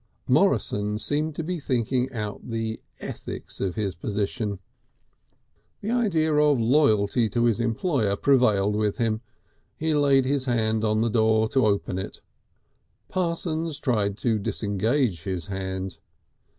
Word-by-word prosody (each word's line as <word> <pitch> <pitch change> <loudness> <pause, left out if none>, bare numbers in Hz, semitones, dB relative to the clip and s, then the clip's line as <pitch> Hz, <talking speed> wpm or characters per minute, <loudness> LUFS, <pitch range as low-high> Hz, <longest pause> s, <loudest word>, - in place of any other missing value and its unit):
Morrison 105 +1 +2
seemed 150 +6 -1
to 165 - -3
be 175 +2 -3
thinking 125 -1 0
out 105 -4 -5
the 115 -1 -3 0.2
ethics - - -6
of 95 -3 -1
his 100 -4 -1
position. 100 +3 -2 1.2
The 215 - -2
idea 175 -11 +2
of 150 -3 +4
loyalty 115 -3 +3
to 120 +3 0
his 115 -2 +2
employer 115 - 0
prevailed 105 -6 +3
with 105 -1 0
him. 110 -2 0 0.6
He 160 0 0
laid 140 -3 +4
his 135 0 0
hand 110 -3 +1
on 110 0 +2
the 115 - +2
door 110 0 +3
to 130 -5 +3
open 100 -2 0
it; 95 - -6 0.9
Parsons 165 -3 -2
tried 105 -8 0
to 110 -3 0
disengage 105 - 0
his 90 -2 -3
hand. 95 -1 -4
115 Hz, 135 wpm, -25 LUFS, 105-140 Hz, 1.2 s, of